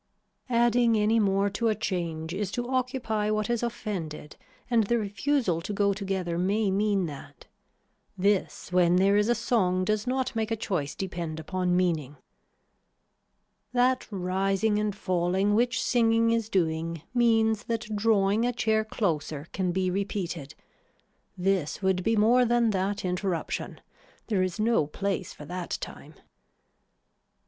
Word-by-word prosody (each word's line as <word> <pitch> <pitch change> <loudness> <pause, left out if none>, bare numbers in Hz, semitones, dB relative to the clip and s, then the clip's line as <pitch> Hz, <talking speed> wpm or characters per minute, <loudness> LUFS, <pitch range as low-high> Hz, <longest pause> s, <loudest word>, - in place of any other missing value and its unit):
Adding 235 -1 +3
any 215 +2 +3
more 195 -1 +2
to 230 +3 -1
a 215 - +2
change 170 -5 -3
is 200 0 -2
to 245 0 -2
occupy 250 -5 -1
what 215 +1 0
is 235 - 0
offended 185 -11 -5 0.3
and 230 -3 +3
the 235 - +2
refusal 210 - 0
to 205 - -5
go 200 0 +2
together 190 -4 -2
may 200 +2 +1
mean 200 -1 +1
that. 145 -4 -10 0.7
This 195 -1 0
when 180 -1 +4
there 195 +2 +4
is 210 +2 +3
a 240 - +4
song 185 -7 +1
does 215 +3 -1
not 260 -1 -1
make 220 -1 -1
a 225 - 0
choice 180 -10 -3
depend 170 -4 -4
upon 180 +2 0
meaning. 160 -6 0 1.6
That 255 +1 +2
rising 195 +2 0
and 210 -2 -1
falling 185 +1 +1
which 240 +3 +2
singing 230 -1 +3
is 230 -2 0
doing 165 -4 -1
means 225 -3 +2
that 230 -2 -3
drawing 205 0 +2
a 245 - +2
chair 220 -2 +1
closer 155 -9 -2
can 185 -2 0
be 185 0 0
repeated. 180 -6 -3 0.8
This 185 -2 0
would 190 -1 +1
be 225 +3 +2
more 230 +4 +5
than 240 -1 +2
that 195 +1 -1
interruption. 180 -1 -3 0.5
There 200 -4 +2
is 185 0 -2
no 220 -9 +2
place 195 +3 -3
for 150 - -11
that 180 +2 -4
time. - - -9
200 Hz, 145 wpm, -27 LUFS, 180-225 Hz, 1.6 s, more